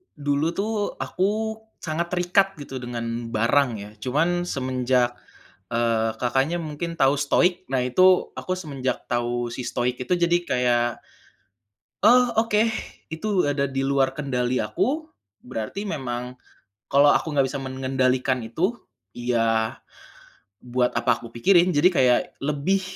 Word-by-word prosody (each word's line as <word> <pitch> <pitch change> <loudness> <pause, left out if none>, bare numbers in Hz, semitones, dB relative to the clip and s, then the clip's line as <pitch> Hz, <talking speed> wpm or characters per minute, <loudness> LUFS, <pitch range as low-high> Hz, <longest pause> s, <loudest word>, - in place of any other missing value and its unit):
Dulu 145 +1 0
tuh 210 0 -2
aku 215 +4 -1 0.3
sangat 165 +1 -2
terikat 180 +2 +2
gitu 135 -2 -6
dengan 120 -1 -4
barang 120 +5 +2
ya, 100 0 -8
cuman 170 +8 0
semenjak, 130 -3 0 0.6
eee, 115 -1 +1
Kakaknya 135 +7 0
mungkin 165 +1 -5
tahu 135 -2 +4
stoik? 180 +5 +2
Nah 130 -2 +1
itu 185 +8 +4
aku 185 - -3
semenjak 140 -8 -4
tahu 120 0 -1
si 125 - -5
stoik 125 0 -1
itu 125 - 0
jadi 175 0 +3
kayak, 120 -1 +2 1.2
oh 250 +4 +7 0.2
oke 210 -1 +3 0.5
itu 160 +7 -4 0.2
ada 145 -1 0
di 135 0 -2
luar 135 -1 +2
kendali 130 -3 -1
aku, 270 - -1 0.4
berarti 130 - -5
memang 125 -6 -4 0.6
kalau 145 +1 +6
aku 160 - 0
nggak 140 -2 +3
bisa 140 - -4
mengendalikan 130 -1 0
itu, 180 - -1 0.3
ya 115 -2 0 0.9
buat 125 0 +1
apa - - +2
aku 115 - -9
pikirin. 175 +10 +4
Jadi 155 +5 +5
kayak 125 -5 +4 0.2
lebih, 150 +7 0
135 Hz, 130 wpm, -24 LUFS, 125-175 Hz, 1.2 s, oh